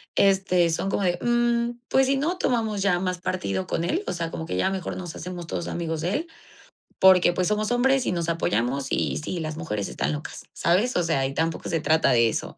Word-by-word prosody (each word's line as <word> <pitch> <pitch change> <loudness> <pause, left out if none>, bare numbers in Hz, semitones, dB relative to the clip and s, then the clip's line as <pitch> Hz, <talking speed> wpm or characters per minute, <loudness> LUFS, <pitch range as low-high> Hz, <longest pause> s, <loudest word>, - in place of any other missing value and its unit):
este, 190 -3 +3
son 190 +4 -1
como 200 - -1
de: 175 -1 +1
"Mm, 240 0 +1
pues 265 0 +3
si 275 +1 +2
no 330 +7 -1
tomamos 225 - 0
ya 180 -3 +2
más 185 -1 -2
partido 100 - -2
con - - -1
él, 340 - -1
o - - -1
sea, 165 -2 -3
como 160 - -5
que - - -3
ya 95 - +2
mejor 190 -3 -4
nos 175 -3 -7
hacemos 180 0 -6
todos 170 - -4
amigos 165 -2 -3
de 175 +4 -1
él, 320 +9 -2 0.7
porque 185 -2 +6
pues 180 0 0
somos 210 +2 0
hombres 260 +1 +3
y - - 0
nos 170 -1 -2
apoyamos 135 -4 0
y - - 0
sí, 170 +3 -4
las 155 -1 -4
mujeres 105 - -3
están - - -2
locas", 150 0 -7
¿sabes? 205 +9 +1
O 175 - +2
sea, 155 -5 +1
y 135 - -6
tampoco 165 +2 -2
se 165 - 0
trata 160 -1 +3
de 115 -2 +4
eso. - - -4
180 Hz, 230 wpm, -25 LUFS, 160-210 Hz, 0.7 s, porque